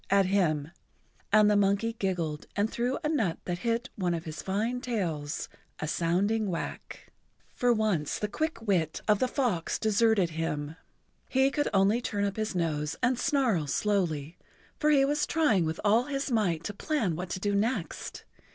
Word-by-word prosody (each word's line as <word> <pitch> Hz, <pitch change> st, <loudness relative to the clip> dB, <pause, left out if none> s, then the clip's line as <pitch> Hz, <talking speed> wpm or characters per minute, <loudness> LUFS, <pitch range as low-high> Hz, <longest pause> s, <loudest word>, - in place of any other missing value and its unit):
at 195 Hz, 0 st, +4 dB
him, 165 Hz, -6 st, +1 dB, 0.6 s
and 215 Hz, -1 st, +6 dB
the 210 Hz, -, +4 dB
monkey 205 Hz, +3 st, +2 dB
giggled 175 Hz, -8 st, -2 dB
and 205 Hz, +2 st, +1 dB
threw 245 Hz, +3 st, -1 dB
a -, -, +1 dB
nut 230 Hz, -, 0 dB
that 175 Hz, -1 st, -3 dB
hit 235 Hz, +3 st, -1 dB
one 180 Hz, -3 st, 0 dB
of 165 Hz, -, -6 dB
his 155 Hz, -2 st, -6 dB
fine 225 Hz, +6 st, -1 dB
tails 170 Hz, -, -2 dB, 0.3 s
a 150 Hz, -, -4 dB
sounding 195 Hz, +7 st, +1 dB
whack. 170 Hz, -, -6 dB, 0.4 s
For 245 Hz, -1 st, +2 dB
once 215 Hz, -10 st, +1 dB
the 210 Hz, -, -2 dB
quick 310 Hz, +1 st, -3 dB
wit 175 Hz, -7 st, 0 dB
of 210 Hz, -1 st, +4 dB
the 255 Hz, -, +2 dB
fox 240 Hz, -, 0 dB
deserted[Pg 220 Hz, 0 st, +3 dB
82] 165 Hz, -2 st, -3 dB
him. 155 Hz, -1 st, -3 dB, 0.5 s
He 265 Hz, +1 st, +3 dB
could 290 Hz, 0 st, 0 dB
only 200 Hz, +4 st, +3 dB
turn 205 Hz, -4 st, -2 dB
up 200 Hz, +1 st, -3 dB
his 215 Hz, -2 st, -2 dB
nose 155 Hz, -3 st, -1 dB
and 250 Hz, 0 st, +2 dB
snarl 235 Hz, -, +1 dB
slowly, 165 Hz, -3 st, -1 dB, 0.4 s
for 300 Hz, -, +3 dB
he 280 Hz, -2 st, +5 dB
was 295 Hz, +2 st, 0 dB
trying 235 Hz, -, +2 dB
with 160 Hz, +1 st, -3 dB
all 225 Hz, +4 st, +4 dB
his 280 Hz, -1 st, -3 dB
might 180 Hz, -8 st, +1 dB
to 205 Hz, -, -4 dB
plan 215 Hz, -, -1 dB
what 180 Hz, +2 st, -5 dB
to 185 Hz, -, -3 dB
do 205 Hz, +1 st, 0 dB
next. 200 Hz, -, -2 dB
205 Hz, 180 wpm, -29 LUFS, 170-235 Hz, 0.6 s, and